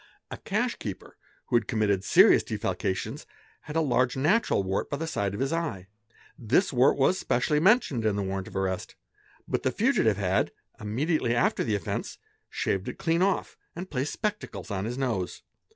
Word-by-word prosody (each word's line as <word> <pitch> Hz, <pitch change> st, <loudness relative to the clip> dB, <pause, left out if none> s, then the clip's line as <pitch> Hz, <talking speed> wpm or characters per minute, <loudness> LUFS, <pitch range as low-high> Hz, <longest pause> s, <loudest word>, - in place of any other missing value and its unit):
A -, -, -5 dB
cash -, -, -1 dB
keeper, -, -, -7 dB, 0.3 s
who -, -, -1 dB
had 115 Hz, -4 st, +2 dB
committed 100 Hz, -4 st, +1 dB
serious -, -, +6 dB
defalcations, 95 Hz, -, -3 dB, 0.3 s
had 150 Hz, -, -9 dB
a 165 Hz, -, +3 dB
large 125 Hz, -3 st, +1 dB
natural 160 Hz, -, +2 dB
wart 95 Hz, +1 st, -2 dB
by 145 Hz, -, -2 dB
the 165 Hz, -, -3 dB
side 100 Hz, -11 st, -2 dB
of -, -, -6 dB
his 135 Hz, +3 st, 0 dB
eye. 145 Hz, -, -3 dB, 0.5 s
This 130 Hz, -, +2 dB
wart 125 Hz, +2 st, +4 dB
was 145 Hz, +7 st, +3 dB
specially 150 Hz, +5 st, +1 dB
mentioned 170 Hz, -, +3 dB
in 110 Hz, -2 st, +1 dB
the 100 Hz, -, -1 dB
warrant 95 Hz, 0 st, -3 dB
of -, -, -12 dB
arrest; 95 Hz, -1 st, -2 dB, 0.5 s
but -, -, -1 dB
the -, -, +1 dB
fugitive 130 Hz, -, +2 dB
had, 95 Hz, -2 st, +1 dB, 0.3 s
immediately 120 Hz, +4 st, 0 dB
after 120 Hz, -, +2 dB
the 110 Hz, -, 0 dB
offence, 100 Hz, -, -4 dB, 0.3 s
shaved 95 Hz, 0 st, -2 dB
it -, -, -7 dB
clean 165 Hz, +1 st, +1 dB
off 195 Hz, +1 st, 0 dB, 0.2 s
and 185 Hz, +2 st, -7 dB
placed 135 Hz, +1 st, -2 dB
spectacles 210 Hz, -, -4 dB
on 95 Hz, 0 st, -2 dB
his 120 Hz, +3 st, -4 dB
nose. 115 Hz, -9 st, -2 dB
120 Hz, 180 wpm, -27 LUFS, 100-160 Hz, 0.5 s, serious